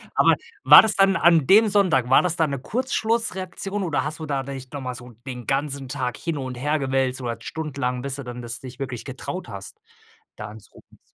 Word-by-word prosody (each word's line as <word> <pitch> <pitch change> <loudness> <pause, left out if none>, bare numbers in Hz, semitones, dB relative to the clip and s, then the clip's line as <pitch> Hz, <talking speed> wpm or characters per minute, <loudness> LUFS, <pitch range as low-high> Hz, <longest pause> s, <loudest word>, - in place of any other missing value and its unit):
Aber - - +5 0.3
war - - +10
das 220 - 0
dann 195 -1 +4
an 170 -3 +4
dem 215 +3 +6
Sonntag, 180 -12 +2
war 130 - +6
das 175 -2 -1
dann 160 -4 +1
'ne 140 - -3
Kurzschlussreaktion 210 - -2
oder 150 -7 -1
hast 150 +2 -4
du 160 - -5
da 140 -3 -2
dich 135 -1 -8
noch 145 - -6
mal 130 -1 -4
so 125 0 -10 0.2
den 125 -3 -7
ganzen 140 -1 -1
Tag 125 -3 -3
hin 165 -3 -3
und 130 -2 -5
her 145 +5 0
gewälzt 130 -1 -1
oder 120 -2 -3
stundenlang 140 -5 -4
bis 135 0 -4
du 140 - -7
dann 125 0 -7
das 115 -1 -5
dich 130 -1 -11
wirklich 130 -4 -5
getraut 140 +7 -6
hast 440 - -9 0.6
da - - -7
anzurufen? - - -16
140 Hz, 210 wpm, -23 LUFS, 130-175 Hz, 0.6 s, war